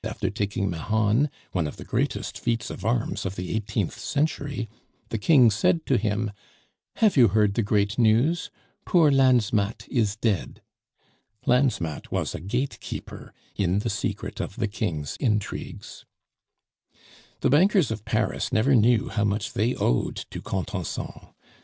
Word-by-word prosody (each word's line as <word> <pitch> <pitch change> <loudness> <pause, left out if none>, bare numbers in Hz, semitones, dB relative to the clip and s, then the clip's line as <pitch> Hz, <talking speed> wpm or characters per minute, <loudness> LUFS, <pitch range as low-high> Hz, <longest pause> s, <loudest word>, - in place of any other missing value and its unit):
after - - -2
taking 100 -1 -1
Mahon, 110 - +1 0.2
one 85 -4 0
of - - -8
the - - -9
greatest - - -2
feats 115 -2 -1
of - - -8
arms 115 +2 0
of 95 0 -4
the 90 +2 -4
eighteenth 105 -1 -2
century, 145 -2 -1 0.4
the 115 - -2
King 125 -2 +6
said 140 +9 +1
to 135 - +2
him, 105 -1 0 0.6
"Have 215 -3 +3
you 125 -5 +7
heard 105 0 +2
the 115 - +1
great 105 +1 +1
news? 120 +9 +3 0.3
Poor 165 -5 +4
Lansmatt 120 -6 +2
is 110 -4 +1
dead." 110 -5 -2 0.8
Lansmatt 120 - +1
was - - -1
a - - -5
gatekeeper 120 - -5 0.2
in 95 -1 +1
the 105 - -1
secret - - -3
of - - -4
the 115 -2 -1
King's 90 -9 -3
intrigues. 105 -6 -3 1.4
The - - +2
bankers 180 - +4
of 110 -2 -4
Paris 110 +1 -1
never 125 +3 +3
knew 115 -1 +4
how 105 - 0
much 105 0 -1
they 115 +5 +1
owed - - 0 0.2
to - - -6
Contenson. 95 -2 -4
110 Hz, 145 wpm, -25 LUFS, 100-125 Hz, 1.4 s, you